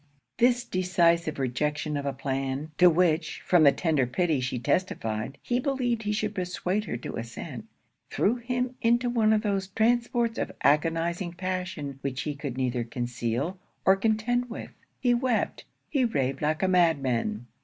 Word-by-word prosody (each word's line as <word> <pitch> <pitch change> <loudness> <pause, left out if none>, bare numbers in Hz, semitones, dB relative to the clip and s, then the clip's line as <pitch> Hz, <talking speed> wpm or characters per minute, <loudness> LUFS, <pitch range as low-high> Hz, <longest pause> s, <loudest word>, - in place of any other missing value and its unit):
This 245 0 +4
decisive 170 -4 +2
rejection 150 +4 -1
of 140 0 -2
a - - +1
plan, 135 +2 -3
to 180 0 +8
which, 165 -2 +1
from 175 -2 +5
the 140 - +8
tender 150 -5 +1
pity 160 +2 +1
she 130 0 -2
testified, 115 - -1
he 245 0 0
believed 250 -4 0
he 210 -1 -2
should 210 0 -1
persuade 185 +2 -2
her 120 - -3
to 120 - -6
assent, 115 0 -7 0.4
threw 225 +5 +1
him 250 +1 -2
into 240 +1 +2
one 220 -3 +3
of 215 0 +2
those 195 -2 0
transports 235 +3 +1
of - - -3
agonizing 165 +4 +1
passion 180 -7 -4
which 135 -1 -3
he 150 - -2
could 140 -3 -6
neither 125 -2 0
conceal 120 +7 -3 0.3
or 190 - +7
contend 225 +4 0
with. 230 - -7 0.3
He 245 -2 +3
wept; 240 -1 0 0.2
he 275 -4 +1
raved 135 - 0
like 155 +3 0
a - - +4
madman. 135 - +1
175 Hz, 160 wpm, -27 LUFS, 140-220 Hz, 0.4 s, to